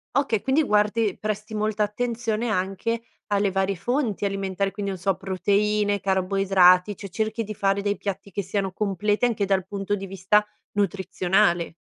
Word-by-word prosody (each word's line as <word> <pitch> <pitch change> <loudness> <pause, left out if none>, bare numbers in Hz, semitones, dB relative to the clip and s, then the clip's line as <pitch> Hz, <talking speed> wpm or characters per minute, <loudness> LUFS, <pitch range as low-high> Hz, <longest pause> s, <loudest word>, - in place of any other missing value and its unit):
Okay, 270 -7 +1
quindi 270 +4 +2
guardi 210 -2 +1
presti 215 +1 -4
molta 215 0 0
attenzione 230 +1 -2
anche 195 +4 -1 0.3
alle 200 -1 +2
varie 195 0 0
fonti 235 - -1
alimentari, 195 0 -1
quindi 200 -1 -3
non 185 - -6
so 195 0 +1
proteine, 205 +2 0
carboidrati, 190 0 +3
cioè 200 - -8
cerchi 220 +3 -2
di 215 - -5
fare 195 0 +1
dei 205 0 0
piatti 200 0 -5
che 200 +2 -3
siano 195 0 -2
completi 210 +2 -1
anche 220 -4 +2
dal 190 -2 +1
punto 200 +1 -2
di 195 0 -6
vista 195 +3 +2 0.3
nutrizionale. 190 -3 +1
200 Hz, 155 wpm, -24 LUFS, 195-215 Hz, 0.3 s, carboidrati